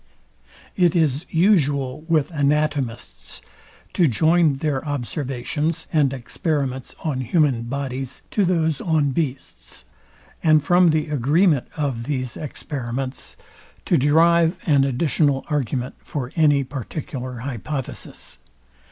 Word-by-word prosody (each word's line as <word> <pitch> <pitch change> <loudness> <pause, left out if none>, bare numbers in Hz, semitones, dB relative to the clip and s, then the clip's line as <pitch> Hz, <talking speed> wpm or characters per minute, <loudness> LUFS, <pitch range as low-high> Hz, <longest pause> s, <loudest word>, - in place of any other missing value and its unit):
It 175 -3 +3
is 155 -3 +1
usual 145 -7 +2
with 160 -2 +2
anatomists 145 -5 -1 0.5
to 175 - +4
join 155 +4 +3
their 135 -1 -1
observations 145 +2 -2
and 145 -4 +3
experiments 135 0 -3
on 140 -5 -1
human 130 -3 +1
bodies 135 0 -4
to 205 - +2
those 160 -5 +1
on 155 -5 +1
beasts, 130 - -5 0.6
and 155 -2 +4
from 175 +3 +5
the 155 0 +1
agreement 150 +2 +2
of 135 -6 -2
these 130 -4 -3
experiments 135 -3 -5 0.5
to - - +3
derive 165 +4 +4
an 140 -4 +4
additional 140 +1 +1
argument 130 -3 -1
for 130 -3 -5
any 145 -4 +4
particular 130 -1 -6
hypothesis. 135 +1 -6
145 Hz, 110 wpm, -22 LUFS, 130-160 Hz, 0.6 s, from